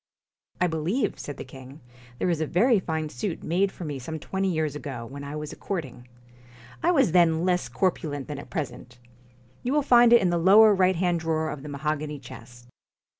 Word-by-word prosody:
' - - -41
I - - +5
believe,' 170 - -1
said 145 - -7
the - - -6
king, 130 +2 -12 0.2
' 120 0 -22
there 180 - 0
is 160 -2 -1
a 155 - 0
very 220 - +3
fine 160 -3 -3
suit 185 +1 -4
made 190 +4 +1
for 180 - -8
me 145 -3 -4
some 160 +5 -6
twenty 190 +5 -2
years 155 -3 -1
ago, 135 -5 -6
when 140 +4 -9
I 140 +1 -6
was 150 0 -6
courting. 130 -10 -6 0.7
I 345 - +2
was 275 - +3
then 170 -1 +3
less 180 -1 0
cor 185 -1 +2
pulent 145 -5 -6
than 145 -2 -6
at - - -11
present. 125 -6 -6 0.6
You 250 - -2
will 295 -1 +2
find 240 -3 +6
it 235 - +8
in 180 - +2
the 170 - +1
lower 205 +5 +7
right 185 -1 +3
hand 175 0 +1
drawer 160 -1 -1
of 145 -2 -7
the 150 - -8
mahogany 150 +1 -3
chest. 120 -2 -13
160 Hz, 215 wpm, -26 LUFS, 140-185 Hz, 0.7 s, it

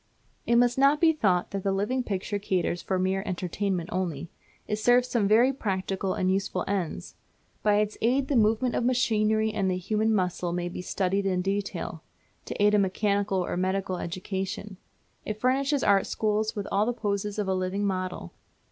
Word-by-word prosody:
It 235 - +3
must 245 +1 +3
not 280 +2 +5
be 325 0 +5
thought 185 - +1
that 195 - -3
the 195 - 0
Living 210 +7 0
Picture 205 -1 -3
caters 185 -3 -1
for 190 - -1
mere 190 +1 0
entertainment 185 -1 -2
only. 170 -3 -3 0.4
It 210 - -1
serves 245 +3 +4
some 230 -5 +1
very 235 +6 +5
practical 195 -4 -2
and 185 0 +1
useful 195 0 -2
ends. 180 - -3 0.5
By 210 -1 +3
its 210 0 0
aid 260 +4 +2
the 285 - 0
movements 225 +2 +2
of - - 0
machinery 220 -3 +2
and 195 -3 0
the 180 - 0
human 215 +4 0
muscles 180 -3 0
may 175 0 -2
be 175 - -6
studied 195 +2 -1
in 180 -1 0
detail, 195 -4 -3 0.4
to - - -6
aid 205 +1 +4
a 210 - +5
mechanical 200 -1 0
or - - -3
medical 185 0 -1
education. 190 +3 -4 0.5
It 215 0 -5
furnishes 275 +3 +1
art 200 -1 +3
schools 215 +1 0
with 205 -2 -4
all 205 +2 +2
the 245 - +1
poses 205 -2 -2
of 210 -2 -1
a 190 - +1
living 185 +2 -1
model. 185 - -3
200 Hz, 185 wpm, -27 LUFS, 185-220 Hz, 0.5 s, not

